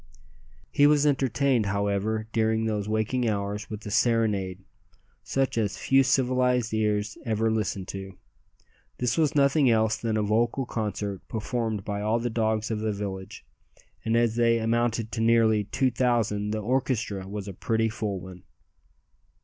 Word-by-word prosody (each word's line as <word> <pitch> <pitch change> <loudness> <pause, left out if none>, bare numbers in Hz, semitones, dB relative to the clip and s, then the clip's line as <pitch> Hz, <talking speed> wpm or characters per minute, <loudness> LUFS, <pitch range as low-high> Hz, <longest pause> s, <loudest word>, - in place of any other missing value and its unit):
He 145 - +5
was 150 0 +4
entertained, 135 -4 +2
however, 100 +2 -1
during 110 0 +1
those 105 -2 -2
waking 110 +3 0
hours 105 0 -3
with 105 0 -7
a 105 - -5
serenade 105 -5 +1 0.6
such 135 -3 0
as 105 -3 -1
few 135 0 +3
civilized 125 -3 +1
ears 105 -1 0
ever 110 -1 0
listen 105 -3 -2
to. 95 0 -8 0.8
This 125 -1 0
was 155 -4 +1
nothing 140 -1 +4
else 110 -1 +2
than 115 -1 -1
a 105 - +1
vocal 115 +5 +1
concert 105 -4 -3
performed 110 -2 -3
by 100 -1 -3
all 110 +2 +1
the 120 0 -2
dogs 110 -1 0
of 110 - -1
the 110 0 -1
village, 100 -2 -6 0.6
and 115 +1 +1
as 115 -1 +1
they 115 -1 +4
amounted 115 0 0
to 115 - -3
nearly 115 -2 +3
two 130 +5 0
thousand 115 -4 0
the 110 0 -2
orchestra 110 -5 -1
was 100 0 -6
a 100 - -6
pretty 110 +4 0
full 105 -3 -3
one. 90 0 -11
110 Hz, 155 wpm, -26 LUFS, 105-120 Hz, 0.8 s, He